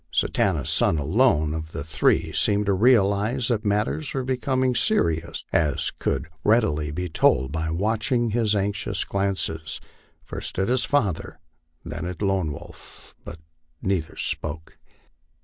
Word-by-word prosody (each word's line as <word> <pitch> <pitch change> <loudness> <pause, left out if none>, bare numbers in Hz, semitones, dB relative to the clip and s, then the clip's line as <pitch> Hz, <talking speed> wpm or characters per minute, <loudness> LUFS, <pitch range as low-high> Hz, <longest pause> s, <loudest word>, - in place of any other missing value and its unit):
Satanta's - - 0
son 80 - +3
alone 75 - +2
of 80 0 -6
the 70 - -4
three 80 +1 +1
seemed 105 0 +2
to 100 - +2
realize 110 +2 +3
that 115 -3 0
matters 105 +9 -1
were 135 - -1
becoming 130 0 0
serious, 85 - +1
as 75 -5 +1
could 70 +2 -2 0.2
readily 80 -10 +2
be 90 +5 -3
told 65 -5 +2
by 80 +1 -2
watching 110 - 0
his 110 -2 +2
anxious 100 0 -1
glances, 95 -6 -1 0.4
first - - -4
at 95 +4 0
his 125 -1 +2
father, 110 - -1 0.5
then 90 - -5
at 90 -1 -6
Lone 95 -5 +1
Wolf; - - -11
but 85 - -9 0.5
neither 95 -4 -1
spoke. 80 +1 -4
100 Hz, 135 wpm, -24 LUFS, 80-115 Hz, 0.5 s, son